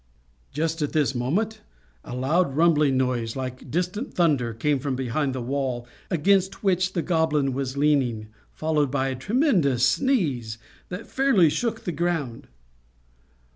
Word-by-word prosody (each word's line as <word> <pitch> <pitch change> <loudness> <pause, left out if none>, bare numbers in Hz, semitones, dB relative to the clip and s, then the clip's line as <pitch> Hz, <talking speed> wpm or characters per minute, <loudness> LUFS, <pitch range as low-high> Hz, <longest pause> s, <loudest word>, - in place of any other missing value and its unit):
Just 160 +2 -2
at 145 - -1
this 145 -5 +2
moment 175 - -1 0.4
a 125 - -7
loud, 135 +3 +1
rumbling 150 -4 +3
noise, 125 -3 -1
like 130 0 -6
distant 180 - -2
thunder, 145 -9 +2
came 140 +5 0
from 135 0 -2
behind 130 +2 -1
the 125 - -3
wall 130 -2 -2 0.2
against 190 +3 +1
which 185 -1 +1
the 170 - -1
Goblin 155 -5 +1
was 135 0 -3
leaning, 130 -7 +1 0.2
followed 155 -3 0
by 135 0 0
a 130 - -3
tremendous 175 - +2
sneeze, 145 - 0 0.3
that 180 +5 -6
fairly 235 - +3
shook 235 +6 -2
the 175 - -2
ground. 155 -7 -2
145 Hz, 140 wpm, -25 LUFS, 130-175 Hz, 0.4 s, rumbling